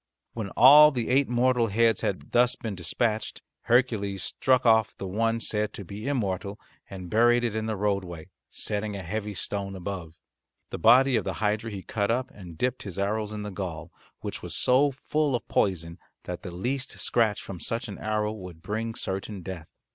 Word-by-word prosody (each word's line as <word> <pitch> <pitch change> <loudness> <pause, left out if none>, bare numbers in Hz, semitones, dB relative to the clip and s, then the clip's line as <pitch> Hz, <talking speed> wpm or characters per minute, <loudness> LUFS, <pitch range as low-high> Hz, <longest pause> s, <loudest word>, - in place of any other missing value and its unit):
When 110 -4 -4
all 150 +4 +9
the 125 -6 -3
eight 135 +1 +3
mortal 125 -1 +2
heads 115 +1 +2
had 95 - -3
thus 120 0 +3
been 110 -3 -5
dispatched 105 +5 -2 0.2
Hercules 110 -6 +1
struck 130 -1 +1
off 110 -2 +4
the - - -5
one 115 +4 0
said 105 -1 -2
to 100 - -8
be 105 +7 -7
immortal 100 -6 -2 0.3
and 95 -2 -8
buried 120 +5 +4
it 115 -3 -1
in 110 0 -2
the 110 - -1
roadway, 95 -5 -2 0.2
setting 105 0 -3
a 95 - -5
heavy 105 +3 -4
stone 100 0 -4
above. 90 -3 -6 0.6
The - - -5
body 125 +6 +6
of 110 - -1
the - - -3
hydra 110 +1 -1
he 100 -3 -7
cut 100 -2 -1
up 125 +3 0
and 90 -5 -11
dipped 125 +6 -1
his 100 -3 -7
arrows 105 +2 -1
in 105 -1 -5
the 105 - -5
gall, 90 -4 -6 0.3
which - - -5
was - - -3
so 130 +3 +4
full 140 +1 -1
of 120 - -4
poison 85 -3 0 0.2
that 90 -1 -6
the 90 - -7
least 125 +10 -3
scratch 110 -4 +1
from 95 -3 -8
such 115 +10 -3
an 100 - -8
arrow 105 -1 -1
would 90 -6 -10
bring 110 +2 -3
certain 95 0 -4
death. 85 -4 -7
105 Hz, 190 wpm, -27 LUFS, 95-120 Hz, 0.6 s, all